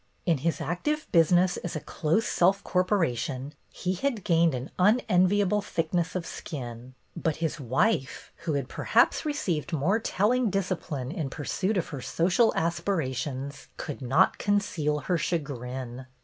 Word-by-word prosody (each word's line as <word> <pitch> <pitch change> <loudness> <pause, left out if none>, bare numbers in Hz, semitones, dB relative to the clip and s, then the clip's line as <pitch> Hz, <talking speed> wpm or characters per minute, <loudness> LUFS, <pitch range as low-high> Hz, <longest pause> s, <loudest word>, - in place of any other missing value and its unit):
In 165 -5 +2
his 165 +4 0
active 300 - -1
business 175 +2 +4
as 175 - -5
a - - -1
close 165 +9 0
self 190 +3 +2
corporation 150 - 0 0.2
he 180 0 -2
had 230 +1 -2
gained 165 -4 +3
an 125 +3 -6
unenviable 205 -1 +3
thickness 170 -2 -1
of 180 -2 -2
skin, 125 -6 -7 0.2
but 160 -3 -1
his 160 -2 -2
wife, 135 - 0
who 165 -2 -3
had 140 -3 -1
per - - -6
haps 240 +7 +3
received 180 - -2
more 165 +9 +2
telling 230 +3 +1
discipline 180 -9 -2
in 150 -5 -3
pursuit 185 +9 -1
of 175 - -1
her 140 -4 -6
social 185 - +2
aspirations, 150 -5 -2
could 145 -2 -6
not 135 +9 +3
conceal 165 -8 0
her 180 -2 0
chagrin. 130 -5 -4
170 Hz, 145 wpm, -27 LUFS, 140-190 Hz, 0.2 s, business